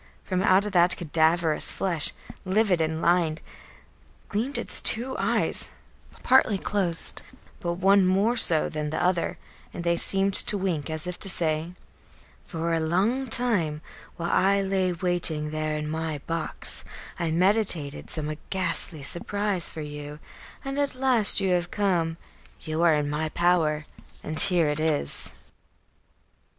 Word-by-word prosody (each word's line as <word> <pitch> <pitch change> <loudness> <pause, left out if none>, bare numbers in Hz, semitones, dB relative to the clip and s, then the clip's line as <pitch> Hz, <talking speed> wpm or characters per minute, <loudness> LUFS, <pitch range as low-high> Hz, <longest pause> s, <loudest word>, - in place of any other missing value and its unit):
From 185 -1 -2
out 190 0 +3
the 180 -4 +2
cadaverous 160 0 +4
flesh, 170 -6 0 0.3
livid 190 -2 +1
and 160 0 -3
lined, 170 -2 +1 0.9
gleamed 235 +7 -3
its - - +4
two 245 +4 +3
eyes, - - -1 0.5
partly 255 -6 +3
closed, 185 -4 -3 0.4
but 170 -4 -3
one 195 +1 +3
more 200 +6 +1
so 165 -9 +5
than 150 -1 -5
the 155 - -4
other, 175 -1 -1 0.4
and 175 - -6
they 170 0 +1
seemed 195 +2 0
to 205 - +4
wink, 175 -6 -3
as 160 +1 -3
if 180 0 -6
to 195 - 0
say: 160 -1 -1 0.7
"For 165 -1 -4
a 165 - 0
long 200 +12 -1
time, 205 -11 0 0.3
while 170 0 -3
I 195 +1 +2
lay 190 -1 -1
waiting 170 -3 0
there 155 0 -3
in 150 0 -5
my 160 0 -4
box, 165 0 -1 0.4
I 170 - -2
meditated 175 -4 0
some 155 -1 -4
ghastly 175 -5 +1
surprise 195 +3 -2
for 160 - -8
you, 150 0 -8 0.5
and 275 +1 -4
at 285 -2 -1
last 255 -7 +3
you 190 -2 -1
have 175 -1 -1
come; 175 -5 -1 0.4
you 155 0 -4
are 170 -2 +4
in 150 -1 -2
my 150 +2 -3
power, 160 -3 0 0.4
and 155 +1 -1
here 175 -5 +6
it 150 0 -2
is." 155 - 0
175 Hz, 145 wpm, -25 LUFS, 155-195 Hz, 0.9 s, here